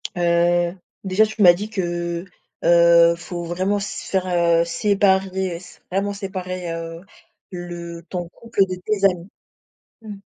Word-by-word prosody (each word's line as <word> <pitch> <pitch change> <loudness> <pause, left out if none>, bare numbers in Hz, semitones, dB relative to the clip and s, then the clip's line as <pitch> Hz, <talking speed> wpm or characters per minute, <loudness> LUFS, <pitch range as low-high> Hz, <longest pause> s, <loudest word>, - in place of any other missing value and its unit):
heu, 175 0 +2 0.3
déjà, 195 +3 +3
tu 215 0 -5
m'as 175 -2 +9
dit 205 +5 -5
que, 175 -3 -3 0.4
heu, 170 0 +6
faut 175 0 -7
vraiment 185 +4 -1
se 200 - -6
faire, 190 -1 -1
heu, 170 -1 +3
séparer, 190 +1 +1
s 180 +1 -15
vraiment 200 +2 -1
séparer, 185 -3 -5
heu, 165 0 -6 0.5
le 175 -1 -7
ton 175 -2 -4
couple, 230 +1 -3
de 185 - -4
tes 205 -2 +1
amis? 180 -1 +1 0.7
Mmh. 215 -2 -8
180 Hz, 140 wpm, -21 LUFS, 170-195 Hz, 0.7 s, m'as